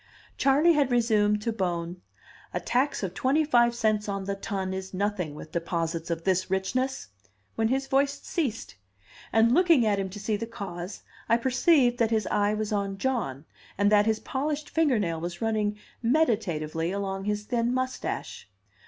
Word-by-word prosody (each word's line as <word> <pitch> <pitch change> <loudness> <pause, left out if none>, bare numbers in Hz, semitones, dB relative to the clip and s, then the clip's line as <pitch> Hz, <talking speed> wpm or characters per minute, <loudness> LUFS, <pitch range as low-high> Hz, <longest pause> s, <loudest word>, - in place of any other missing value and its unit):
Charley 290 +5 +4
had 290 -4 +2
resumed 210 -4 +2
to 230 - -1
Bohm, 175 -3 -3 0.5
"A - - +1
tax 260 -1 0
of 185 -2 -3
twenty 270 +10 +2
five 240 -4 +4
cents 215 -2 0
on 195 -1 -2
the 200 +1 -2
ton 195 -1 -3
is 190 0 -6
nothing 190 -6 -2
with 155 - -10
deposits 165 -1 -2
of 165 -1 -2
this 185 0 +1
richness," 255 +8 -1 0.4
when 225 - +1
his 270 +3 0
voice 280 +1 +1
ceased; 265 - -3 0.6
and 225 +1 +4
looking 335 -7 +5
at 205 -2 +2
him 190 -1 -2
to 205 +3 -8
see 210 +1 -1
the 230 +2 -5
cause, 190 -4 -7 0.3
I 230 - +5
perceived 250 0 +3
that 230 -2 +3
his 220 -2 +1
eye 205 0 +2
was 215 0 -3
on 200 -1 -1
John, 195 - -2 0.3
and 205 +1 +3
that 210 0 +5
his 220 -1 +1
polished 295 +2 -3
finger 305 -6 +3
nail 165 -6 -1
was 175 0 -5
running 215 -2 0 0.2
meditatively 200 - +1
along 195 -1 -3
his 210 0 -1
thin 235 +1 0
mustache. 255 0 -3
210 Hz, 170 wpm, -27 LUFS, 190-250 Hz, 0.6 s, looking